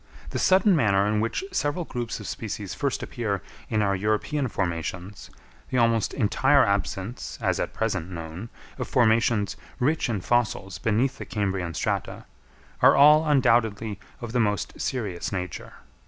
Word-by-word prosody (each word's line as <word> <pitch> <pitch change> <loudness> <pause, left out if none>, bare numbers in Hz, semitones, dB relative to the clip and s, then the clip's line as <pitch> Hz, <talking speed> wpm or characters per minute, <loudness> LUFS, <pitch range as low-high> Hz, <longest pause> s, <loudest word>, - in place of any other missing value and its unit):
The - - -2
sudden 190 +1 +4
manner 100 -8 +3
in 105 +1 +1
which 115 - -1
several 150 - -1
groups 120 -4 -4
of - - -8
species 105 -3 -5
first 140 -2 -2
appear 110 -7 -3 0.3
in 110 -1 +1
our 100 -1 +1
European 110 +8 0
formations, 90 0 -4 0.4
the 130 - -1
almost 115 -2 +2
entire 135 +4 +3
absence, 100 +3 -2
as - - 0
at - - -2
present 100 -6 -1
known, 85 +5 -7 0.3
of - - -3
formations 110 -3 +2 0.2
rich 145 +2 +1
in 110 -4 -1
fossils 100 -5 0
beneath 115 +7 0
the - - -5
Cambrian 95 -5 -2
strata, - - -2 0.6
are - - +7
all 150 +3 +7
undoubtedly 115 -7 +2 0.2
of 120 -2 -5
the 125 - 0
most 105 -3 -1
serious 105 -10 -3
nature. 90 -4 -5
110 Hz, 150 wpm, -25 LUFS, 100-125 Hz, 0.6 s, are